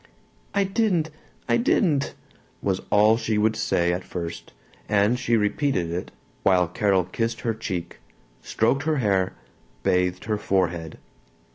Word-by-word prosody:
"I 200 Hz, -, +4 dB
didn't! 195 Hz, -6 st, +1 dB, 0.4 s
I -, -, +3 dB
didn't!" 170 Hz, -, +1 dB, 0.5 s
was 95 Hz, -2 st, 0 dB
all 105 Hz, +2 st, +5 dB
she 110 Hz, -2 st, -1 dB
would 110 Hz, +1 st, +2 dB
say 85 Hz, -5 st, +1 dB
at 90 Hz, +1 st, -3 dB
first, 85 Hz, -2 st, -6 dB, 0.4 s
and 105 Hz, +4 st, +3 dB
she 120 Hz, -2 st, +2 dB
repeated 105 Hz, -, 0 dB
it 90 Hz, +2 st, -4 dB, 0.3 s
while 90 Hz, -2 st, +4 dB
Carol 95 Hz, +1 st, +2 dB
kissed 115 Hz, +6 st, -3 dB
her 115 Hz, -, 0 dB
cheek, 90 Hz, -6 st, -5 dB, 0.4 s
stroked 120 Hz, +5 st, +1 dB
her 155 Hz, -1 st, +1 dB
hair, 95 Hz, -6 st, +1 dB, 0.5 s
bathed 90 Hz, 0 st, +1 dB
her 105 Hz, -1 st, -1 dB
forehead. 85 Hz, -5 st, -1 dB
105 Hz, 135 wpm, -24 LUFS, 90-120 Hz, 0.5 s, all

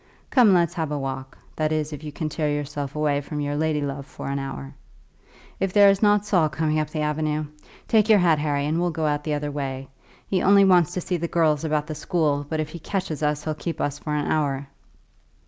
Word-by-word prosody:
Come, 240 Hz, -6 st, +6 dB
let's 175 Hz, -2 st, +3 dB
have 160 Hz, -4 st, -3 dB
a 150 Hz, -, -1 dB
walk; 135 Hz, -1 st, -5 dB, 0.2 s
that 155 Hz, 0 st, 0 dB
is, 155 Hz, -1 st, -1 dB
if 150 Hz, -, -8 dB
you 150 Hz, -, -6 dB
can 155 Hz, +2 st, -4 dB
tear 155 Hz, 0 st, -1 dB
yourself 145 Hz, 0 st, -4 dB
away 150 Hz, -2 st, +1 dB
from 150 Hz, +1 st, -6 dB
your 145 Hz, 0 st, -2 dB
lady 155 Hz, 0 st, 0 dB
love 140 Hz, 0 st, -4 dB
for 135 Hz, -, -7 dB
an 140 Hz, 0 st, -1 dB
hour. 70 Hz, -, -6 dB, 0.9 s
If 195 Hz, -1 st, -1 dB
there 205 Hz, -1 st, +7 dB
is 195 Hz, -, -1 dB
not 205 Hz, -1 st, +4 dB
Saul 175 Hz, -7 st, +2 dB
coming 155 Hz, 0 st, 0 dB
up 155 Hz, -1 st, -2 dB
the 155 Hz, 0 st, -3 dB
avenue! 150 Hz, 0 st, -1 dB, 0.4 s
Take 220 Hz, -1 st, +3 dB
your 215 Hz, -, +7 dB
hat, 170 Hz, -5 st, +3 dB
Harry, 145 Hz, -1 st, 0 dB
and 160 Hz, +3 st, 0 dB
we'll 175 Hz, -, +1 dB
get 160 Hz, -1 st, -2 dB
out 150 Hz, -1 st, 0 dB
the 150 Hz, -1 st, -1 dB
other 145 Hz, 0 st, -3 dB
way. 135 Hz, -2 st, -4 dB, 0.4 s
He 190 Hz, -, 0 dB
only 200 Hz, 0 st, +6 dB
wants 180 Hz, -3 st, +4 dB
to 180 Hz, -, -1 dB
see 180 Hz, +1 st, -2 dB
the 170 Hz, 0 st, -2 dB
girls 160 Hz, -3 st, +2 dB
about 150 Hz, -2 st, 0 dB
the 155 Hz, -, -5 dB
school, 150 Hz, -3 st, 0 dB
but 155 Hz, -, -2 dB
if 155 Hz, -1 st, -2 dB
he 170 Hz, -, -8 dB
catches 165 Hz, -4 st, -3 dB
us 150 Hz, 0 st, 0 dB
he'll 155 Hz, -, -2 dB
keep 165 Hz, +2 st, -5 dB
us 145 Hz, 0 st, -2 dB
for 150 Hz, -, -3 dB
an 150 Hz, -, -1 dB
hour." 140 Hz, -3 st, 0 dB
155 Hz, 235 wpm, -24 LUFS, 145-170 Hz, 0.9 s, there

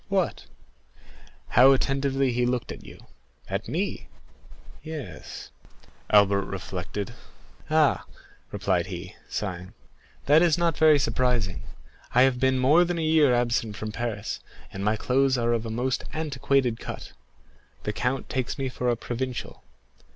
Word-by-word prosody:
"What?" -, -, -1 dB, 1.0 s
"How 130 Hz, +4 st, +7 dB
attentively 135 Hz, 0 st, +1 dB
he 125 Hz, +1 st, 0 dB
looked 125 Hz, -1 st, -1 dB
at -, -, -9 dB
you." -, -, -13 dB, 0.4 s
"At -, -, -3 dB
me?" -, -, -3 dB, 0.7 s
"Yes." 150 Hz, -, -8 dB, 0.6 s
Albert 100 Hz, -2 st, +5 dB
reflected. 95 Hz, +4 st, -5 dB, 0.6 s
"Ah," 155 Hz, -2 st, +3 dB, 0.5 s
replied -, -, 0 dB
he, -, -, -7 dB
sighing, 95 Hz, -3 st, -4 dB, 0.5 s
"that 150 Hz, +3 st, +6 dB
is 170 Hz, -3 st, +4 dB
not 170 Hz, -1 st, +1 dB
very 155 Hz, -1 st, +6 dB
surprising; 120 Hz, -6 st, 0 dB, 0.5 s
I 125 Hz, -, +7 dB
have 130 Hz, -2 st, +2 dB
been 130 Hz, 0 st, +3 dB
more 145 Hz, +7 st, +5 dB
than 175 Hz, 0 st, -2 dB
a 165 Hz, -, -1 dB
year 155 Hz, -4 st, +5 dB
absent 120 Hz, -3 st, 0 dB
from 110 Hz, +1 st, -5 dB
Paris, 115 Hz, -2 st, -3 dB, 0.3 s
and 95 Hz, -, -5 dB
my 105 Hz, +2 st, +2 dB
clothes 130 Hz, +3 st, +2 dB
are 120 Hz, 0 st, +1 dB
of 115 Hz, -1 st, -1 dB
a -, -, -4 dB
most 125 Hz, +4 st, -1 dB
antiquated 140 Hz, -5 st, 0 dB
cut; -, -, -7 dB, 0.7 s
the 105 Hz, -, -2 dB
count 125 Hz, +4 st, -1 dB
takes 130 Hz, +1 st, -2 dB
me 135 Hz, -2 st, -2 dB
for 125 Hz, 0 st, -2 dB
a 120 Hz, -, +2 dB
provincial. 125 Hz, +2 st, -5 dB
125 Hz, 140 wpm, -26 LUFS, 110-135 Hz, 1.0 s, How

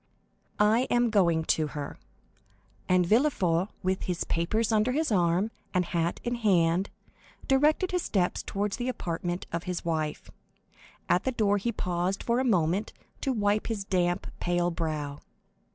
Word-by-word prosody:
"I 220 Hz, +5 st, +4 dB
am 240 Hz, -1 st, +2 dB
going 170 Hz, -6 st, +3 dB
to 155 Hz, -1 st, +1 dB
her." 145 Hz, -, -6 dB, 0.9 s
And 180 Hz, -1 st, +4 dB
Villefort, 190 Hz, -, +2 dB, 0.2 s
with 185 Hz, 0 st, -1 dB
his 180 Hz, -2 st, -1 dB
papers 215 Hz, +7 st, 0 dB
under 220 Hz, +3 st, +2 dB
his 310 Hz, -1 st, 0 dB
arm 180 Hz, +2 st, +2 dB, 0.2 s
and 180 Hz, 0 st, +3 dB
hat 170 Hz, 0 st, -1 dB
in 240 Hz, -, -1 dB
hand, 190 Hz, -5 st, +2 dB, 0.6 s
directed 300 Hz, +7 st, +3 dB
his 360 Hz, -1 st, 0 dB
steps 185 Hz, -, 0 dB
toward 205 Hz, +1 st, -2 dB
the 245 Hz, +4 st, -2 dB
apartment 175 Hz, -5 st, -3 dB
of 170 Hz, +1 st, -3 dB
his 180 Hz, -2 st, -4 dB
wife. 155 Hz, -2 st, -2 dB, 0.8 s
At 180 Hz, -, +2 dB
the 260 Hz, -, 0 dB
door 205 Hz, -4 st, +2 dB
he 235 Hz, +4 st, -1 dB
paused 180 Hz, -2 st, -2 dB
for 235 Hz, +1 st, +1 dB
a -, -, +1 dB
moment 185 Hz, -4 st, +1 dB, 0.3 s
to 270 Hz, -, 0 dB
wipe 210 Hz, -3 st, +1 dB
his 220 Hz, -4 st, -2 dB
damp, 180 Hz, -1 st, 0 dB
pale 175 Hz, 0 st, +1 dB
brow. 155 Hz, -4 st, -3 dB
190 Hz, 150 wpm, -28 LUFS, 170-225 Hz, 0.9 s, I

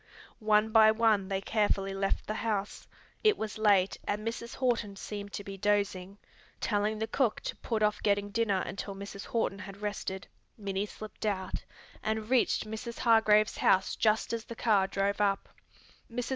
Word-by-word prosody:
One 215 Hz, 0 st, +3 dB
by 220 Hz, -1 st, +7 dB
one 220 Hz, -3 st, +3 dB
they 195 Hz, 0 st, -1 dB
carefully 195 Hz, -2 st, 0 dB
left 195 Hz, 0 st, -1 dB
the 215 Hz, -, -2 dB
house. 215 Hz, -2 st, -3 dB, 0.4 s
It 430 Hz, -2 st, +4 dB
was 215 Hz, 0 st, -4 dB
late, 200 Hz, -3 st, +4 dB
and 210 Hz, +2 st, -2 dB
Mrs. 230 Hz, +1 st, -4 dB
Horton 230 Hz, -6 st, 0 dB
seemed 200 Hz, +1 st, -6 dB
to 205 Hz, -, -4 dB
be 195 Hz, -1 st, -8 dB
dozing. 200 Hz, -1 st, 0 dB, 0.4 s
Telling 210 Hz, 0 st, 0 dB
the 220 Hz, -, -1 dB
cook 235 Hz, -1 st, 0 dB
to -, -, -4 dB
put 220 Hz, -2 st, -1 dB
off 210 Hz, 0 st, +1 dB
getting 205 Hz, 0 st, +1 dB
dinner 205 Hz, -3 st, +1 dB
until 200 Hz, 0 st, -5 dB
Mrs. 200 Hz, 0 st, -8 dB
Horton 225 Hz, -4 st, -1 dB
had 200 Hz, +1 st, -9 dB
rested, 195 Hz, -2 st, -3 dB, 0.3 s
Minnie 200 Hz, -1 st, -2 dB
slipped 215 Hz, +1 st, -10 dB
out, 190 Hz, -3 st, -2 dB, 0.4 s
and 220 Hz, +1 st, -2 dB
reached 250 Hz, -3 st, +3 dB
Mrs. 220 Hz, +2 st, -6 dB
Hargrave's 215 Hz, -2 st, +4 dB
house 190 Hz, 0 st, +3 dB
just 220 Hz, +1 st, +1 dB
as 230 Hz, -1 st, -3 dB
the 235 Hz, -, -8 dB
car 205 Hz, -5 st, +3 dB
drove 200 Hz, +1 st, 0 dB
up. 195 Hz, -1 st, +1 dB, 0.6 s
Mrs. 245 Hz, 0 st, -3 dB
210 Hz, 170 wpm, -30 LUFS, 200-220 Hz, 0.6 s, by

